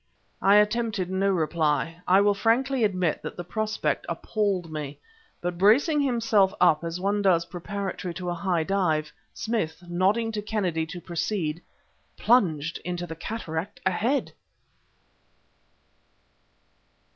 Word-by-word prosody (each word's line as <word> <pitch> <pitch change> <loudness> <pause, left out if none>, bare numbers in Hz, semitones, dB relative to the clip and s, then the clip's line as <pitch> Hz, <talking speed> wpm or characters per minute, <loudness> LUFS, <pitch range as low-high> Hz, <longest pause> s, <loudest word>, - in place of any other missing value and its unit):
I 200 +1 +5
attempted 210 -3 +2
no 195 +1 +1
reply. 165 -1 0
I 190 +2 +6
will 205 0 +4
frankly 240 +5 +1
admit 185 -6 +1
that - - -7
the 175 - -4
prospect 215 +5 -1
appalled 195 -6 -1
me. 150 -2 -5 0.4
But, 175 0 -3
bracing 275 - +4
himself 230 -7 +2
up 165 -3 +4
as 170 +1 -4
one 200 +2 0
does 175 -4 +3
preparatory 190 +1 -5
to 180 -1 -3
a - - -1
high 175 -1 0
dive, 160 -5 0 0.2
Smith, 180 -8 -2
nodding 195 +6 +1
to 215 -1 -3
Kennedy 185 -7 -1
to 175 +2 -8
proceed, 170 -2 -2 0.6
plunged 165 - +2
into 175 0 -4
the 165 - -7
cataract 165 -2 -5
ahead.... 225 +9 0
185 Hz, 125 wpm, -26 LUFS, 170-210 Hz, 0.6 s, I